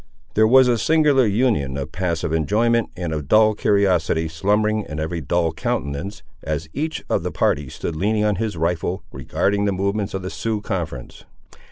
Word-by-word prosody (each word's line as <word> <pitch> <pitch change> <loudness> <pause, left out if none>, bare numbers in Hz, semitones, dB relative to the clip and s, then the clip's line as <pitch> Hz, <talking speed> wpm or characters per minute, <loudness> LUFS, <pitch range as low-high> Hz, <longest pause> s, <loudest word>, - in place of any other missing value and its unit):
There 110 +1 +4
was 130 +2 +6
a 120 -2 +2
singular 150 -5 +3
union 100 - +1
of 70 - -5
passive 85 -4 -2
enjoyment 110 +9 +1
and 85 -3 -3
of 75 -3 -4
dull 110 +4 +5
curiosity 95 -6 +1
slumbering 105 +6 +1
in 75 0 -5
every 80 +2 -3
dull 85 +3 0
countenance, 85 +7 -3 0.2
as 75 +1 -3
each 155 +1 -3
of - - 0
the - - -3
party 70 -2 0
stood 80 - -5
leaning 105 +5 +1
on 105 -2 +1
his 110 -3 -2
rifle, 85 +2 -1
regarding 100 +10 -1
the 100 - +2
movements 100 +2 -2
of 95 - -4
the 95 - -5
Sioux 110 -2 -2
conference. 85 -11 -5
95 Hz, 175 wpm, -21 LUFS, 80-110 Hz, 0.2 s, was